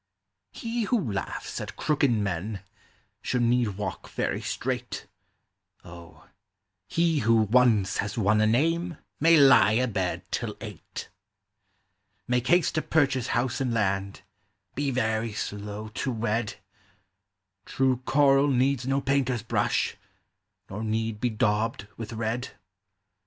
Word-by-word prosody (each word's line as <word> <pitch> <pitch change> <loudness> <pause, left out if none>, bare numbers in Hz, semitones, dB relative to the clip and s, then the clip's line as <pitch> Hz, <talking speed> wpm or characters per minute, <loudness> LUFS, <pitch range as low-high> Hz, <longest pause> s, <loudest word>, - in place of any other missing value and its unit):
He 230 -1 -3
who 190 - 0
laughs 100 - -4
at - - -7
crooked 145 -2 +1
men 100 -2 -2 0.6
should 125 -1 0
need 120 -4 +1
walk 105 - -5
very - - -2
straight; 125 -1 -3 0.8
O, 85 -1 -13 0.6
he 165 -2 +1
who 115 -2 +3
once 110 -2 +3
has 100 +2 -2
won 105 0 +3
a 110 - +4
name 165 +8 +1 0.2
may 165 +2 +6
lie 135 -6 +7
abed 110 -7 0
till - - -3
eight; - - -8 1.2
Make 125 0 0
haste 175 +5 +3
to 155 - 0
purchase 135 -7 +1
house 120 +1 -1
and 125 -3 0
land, 100 -2 -1 0.5
be 145 +1 -1
very 110 -3 -1
slow 105 +1 -5
to 130 +5 -3
wed; 115 -1 -1 1.1
True 130 -1 +1
coral 135 +2 +3
needs 130 -1 +1
no 135 +1 +1
painter's 130 -5 0
brush, 115 - 0 0.7
nor 105 +3 -6
need 110 0 -2
be 125 - +2
daubed 110 0 0
with 115 0 -6
red. 115 +2 -3
120 Hz, 125 wpm, -27 LUFS, 105-135 Hz, 1.2 s, lie